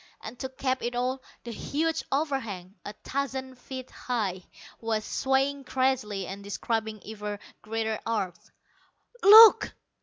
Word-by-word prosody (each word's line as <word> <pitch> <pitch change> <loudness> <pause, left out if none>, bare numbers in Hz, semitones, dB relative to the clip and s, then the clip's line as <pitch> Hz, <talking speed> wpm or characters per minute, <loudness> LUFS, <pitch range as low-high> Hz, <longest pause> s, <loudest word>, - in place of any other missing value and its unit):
And 230 +3 -8
to 265 - -4
cap 260 0 -2
it 240 +1 -3
all, 255 +2 -1 0.2
the 235 - -6
huge 315 +7 -1
overhang, 260 - -2
a 205 - -7
thousand 265 -2 -4
feet 255 0 -8
high, 205 -7 -2 0.4
was 220 -1 -2
swaying 270 +1 0
crazily 250 -8 0
and 195 +3 -7
describing 220 +1 -3
ever 210 -1 -5 0.2
greater 220 0 -2
arcs. 195 -6 -3 0.7
"Look!" 435 +2 +9
245 Hz, 125 wpm, -27 LUFS, 215-265 Hz, 0.7 s, Look